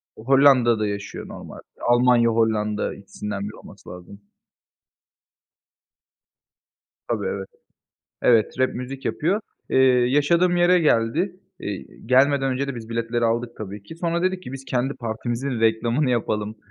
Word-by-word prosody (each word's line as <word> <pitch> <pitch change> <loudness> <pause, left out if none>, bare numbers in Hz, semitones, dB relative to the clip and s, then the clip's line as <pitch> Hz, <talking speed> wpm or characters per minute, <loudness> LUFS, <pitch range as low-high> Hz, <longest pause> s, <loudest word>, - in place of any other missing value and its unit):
Hollanda'da 125 -3 +4
yaşıyor 100 0 -6
normalde. - - -10 0.3
Almanya, 120 -1 +4
Hollanda, 110 -2 0
ikisinden 100 0 -6
biri 105 - -9
olması - - -14
lazım. 90 +3 -11 2.9
Tabii, 110 -4 -1
evet. 95 0 -3 0.8
Evet, 115 -3 +3
rap 130 0 +1
müzik 130 +2 -6
yapıyor. 185 +7 0 0.3
Eee, - - +3 0.3
yaşadığım 170 +6 +3
yere 175 +1 +5
geldi. 165 - +1 0.2
İii, - - -7
gelmeden 135 +2 +3
önce 135 +2 -2
de 140 - -3
biz 115 -2 -8
biletleri 115 0 -1
aldık, 115 +1 0
tabii 105 -1 -7
ki. 130 +11 -11
Sonra 170 0 -1
dedik 185 0 0
ki, 125 - -8
biz 135 0 -8
kendi 130 +1 -1
partimizin 120 +2 -3
reklamını 115 +5 +2
yapalım, 110 -3 -1
120 Hz, 130 wpm, -23 LUFS, 110-140 Hz, 2.9 s, yere